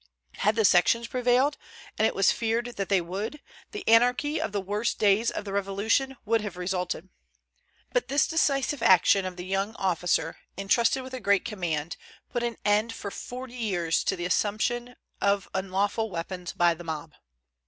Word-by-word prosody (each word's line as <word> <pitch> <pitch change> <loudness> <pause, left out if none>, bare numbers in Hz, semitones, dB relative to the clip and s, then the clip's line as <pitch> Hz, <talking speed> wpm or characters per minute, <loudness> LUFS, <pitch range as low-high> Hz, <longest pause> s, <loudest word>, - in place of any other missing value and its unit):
Had 210 +2 +2
the 220 - +3
sections 200 +6 +4
prevailed, 255 +4 +2 0.4
and 220 - +3
it - - -3
was 195 - +4
feared 230 +1 -1
that 195 -1 -2
they 195 -3 +3
would, 200 - -5 0.3
the 415 -3 -8
anarchy 250 +6 +3
of - - -2
the 205 - -1
worst 205 +4 -2
days 210 +2 +3
of - - -5
the 195 - -5
Revolution 200 +7 0
would 225 +1 +2
have 205 -4 -6
resulted. 180 -1 -3 0.8
But - - +1
this 280 +1 +3
decisive 285 -4 +1
action 190 0 +5
of 185 -1 -4
the 180 - -6
young 195 +3 -1
officer, 180 -4 0 0.2
intrusted 230 +6 +2
with 260 0 -10
a 255 - -4
great 200 -3 +2
command, 175 -8 -3 0.3
put 240 - -1
an 235 -2 -2
end 210 +2 +2
for 200 - -6
forty 250 +3 -7
years 180 -9 0
to - - +1
the 175 - -4
assumption 240 +6 0 0.3
of 200 -1 +1
unlawful 195 +4 -1
weapons 180 0 -5
by 175 -1 +3
the 170 +1 -10
mob. 160 -1 -5
205 Hz, 175 wpm, -27 LUFS, 185-235 Hz, 0.8 s, action